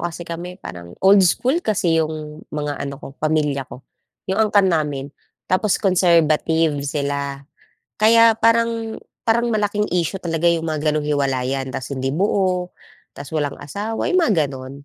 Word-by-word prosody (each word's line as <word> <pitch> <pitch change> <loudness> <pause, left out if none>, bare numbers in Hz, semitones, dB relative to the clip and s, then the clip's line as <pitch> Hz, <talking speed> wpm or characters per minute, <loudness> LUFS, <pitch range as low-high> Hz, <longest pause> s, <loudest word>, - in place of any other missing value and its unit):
kasi 170 0 -4
kami 170 +1 -6
parang 85 0 -9
old 195 +1 +7
school 260 - +1
kasi 185 - +1
'yong 155 -1 -3
mga 150 -1 -4
ano 140 - -5
ko - - -7
pamilya 150 -3 0
ko, 130 - -12 0.5
'yong 215 +3 +3
angkan 200 -2 +4
namin 145 -4 -1 0.4
tapos 185 +2 +2
conservative 165 -4 +2
sila 140 -1 -3 0.5
kaya 225 +1 +5
parang 230 0 +1 0.2
parang 235 +1 +2
malaking 210 -1 0
issue 180 +1 -1
talaga 165 -2 -3
'yong 170 -1 +3
mga 155 -1 0
ganong 150 -1 -2
hiwalayan, 135 -2 -1
tapos 135 +1 -5
hindi 130 +1 -2
buo, 185 0 0 0.4
tapos 140 +1 -9
walang 145 -1 -2
asawa, 205 +10 -4
'yong 370 - +3
mga 240 -11 +2
gano'n. 135 +1 -9
165 Hz, 150 wpm, -20 LUFS, 145-205 Hz, 0.5 s, old